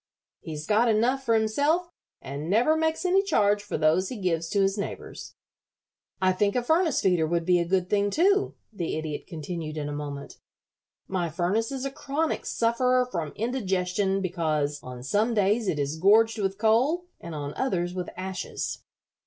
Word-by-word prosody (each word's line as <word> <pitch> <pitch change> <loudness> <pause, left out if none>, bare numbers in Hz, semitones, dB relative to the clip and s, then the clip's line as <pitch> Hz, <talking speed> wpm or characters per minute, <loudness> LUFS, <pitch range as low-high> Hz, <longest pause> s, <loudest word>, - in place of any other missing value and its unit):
He's 155 -2 -7
got 220 +5 +3
enough 240 +5 +2
for 230 -3 +2
himself, 290 +11 +1 0.3
and 145 +4 -5
never 240 +10 +4
makes 320 +2 0
any 375 +2 +4
charge 210 - +2
for 205 - -4
those 160 +5 +2
he 255 - -5
gives 170 -4 -1
to 200 - 0
his 195 0 +2
neighbors." 200 - -6 0.8
"I 185 0 +3
think 200 +2 +1
a 250 - +1
furnace 320 +5 +2
feeder 180 -4 +2
would 170 0 0
be 180 0 +4
a 170 - -1
good 185 0 +1
thing, 205 +1 +1
too," 390 - +2 0.2
the 175 -5 -3
Idiot 155 -2 -5
continued, 160 -1 -5
in 145 -1 -3
a - - -4
moment. 145 -1 -6 0.7
"My 180 -3 -1
furnace 185 - 0
is 270 -1 -4
a 275 - -2
chronic 290 +4 -2
sufferer 250 +2 +2
from 165 -4 -3
indigestion 195 -4 0
because 155 -5 -1
on 125 -1 -9
some 215 - +1
days 210 +2 +2
it 155 - 0
is 145 +2 -2
gorged 220 +5 +4
with 195 -1 -1
coal 245 +11 +2
and 170 - -7
on 145 -1 -4
others 180 -9 -1
with 180 -1 -4
ashes. 185 0 -4
195 Hz, 175 wpm, -26 LUFS, 170-235 Hz, 0.8 s, never